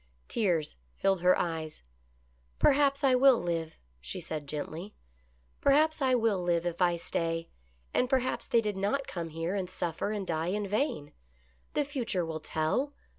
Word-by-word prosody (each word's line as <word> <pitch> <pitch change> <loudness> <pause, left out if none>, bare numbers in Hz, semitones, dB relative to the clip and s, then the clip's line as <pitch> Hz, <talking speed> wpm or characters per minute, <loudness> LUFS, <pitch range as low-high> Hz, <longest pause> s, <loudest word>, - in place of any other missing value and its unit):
Tears 175 - 0 0.2
filled 195 - +1
her 180 +1 +5
eyes. 160 - -3 0.4
" - - -37 0.3
Perhaps 280 0 +3
I 265 -2 +5
will 255 0 +6
live," 165 -3 -3 0.2
she 60 +2 -6
said 150 -2 -5
gently. 155 +7 -5 0.3
" 60 0 -37
Perhaps 305 +2 +4
I 260 -1 +4
will 225 -5 +2
live 175 -1 +1
if 175 +1 -3
I 175 -1 +4
stay, 165 0 -2 0.4
and 250 - +2
perhaps 260 -1 0
they 235 - +4
did 210 -3 -2
not 210 +8 0
come 170 -2 -5
here 165 +3 -3
and 190 -3 -2
suffer 175 0 -2
and 205 -2 -3
die 160 -1 -1
in 205 +2 -1
vain. 205 - -1 0.6
The 295 - +2
future 240 - -1
will 160 -1 -4
tell. 160 - -1
180 Hz, 170 wpm, -30 LUFS, 165-250 Hz, 0.6 s, will